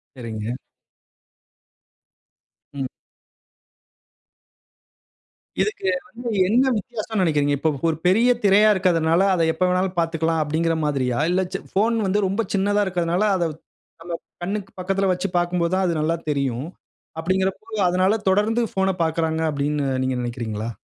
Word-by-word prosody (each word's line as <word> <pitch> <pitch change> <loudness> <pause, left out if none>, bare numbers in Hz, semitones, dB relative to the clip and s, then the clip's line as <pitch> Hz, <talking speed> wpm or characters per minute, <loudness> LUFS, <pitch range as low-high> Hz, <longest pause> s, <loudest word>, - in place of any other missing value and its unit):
சரிங்க. 110 -3 -6 2.3
ம். 135 -2 -3 2.7
இதுக்கு 400 - -1 0.2
வந்து 240 -1 -6 0.2
என்ன 240 +6 +4
வித்தியாசம்ன்னு 215 -2 -3
நினைக்கிறீங்க? 145 -3 +2
இப்ப 160 - +2 0.2
ஒரு 160 - -1
பெரிய 225 +7 +4
திரையா 205 +2 +6
இருக்கதுனால, 170 -2 +2
அதை 170 -3 +2
எப்ப 165 - -2
வேண்னாலும் 185 0 0
பார்த்துக்கலாம் 165 -1 0
அப்படின்கிற 165 +2 0
மாதிரியா? 130 -4 0
இல்ல 185 +1 +2
சி 195 - -2 0.2
போஃன் 225 +3 +2
வந்து 205 +1 +1
ரொம்ப 195 +4 0
சின்னதா 205 +1 +2
இருக்கிறதனால 175 +1 0
அதை 170 -2 +1 0.5
நம்ம 170 0 -5 0.3
கண்ணுக்கு 195 +2 -3
பக்கத்தில 195 +1 0
வச்சு 180 +2 -2
பார்க்கும்போது 175 0 0
தான் 190 0 +1
அது 170 - +1
நல்லா 165 +2 0
தெரியும். 140 -1 -1 0.5
அப்படிகிறபோது 190 +5 -1
அதனால 185 +3 +2
தொடர்ந்து 215 +5 +2
போஃன 190 0 +2
பார்க்குறாங்க 160 0 -1
அப்படின்னு 145 0 -1 0.2
நீங்க 130 -1 -1
நினைக்கிறீங்களா? 115 -2 -4
175 Hz, 125 wpm, -22 LUFS, 155-195 Hz, 2.7 s, திரையா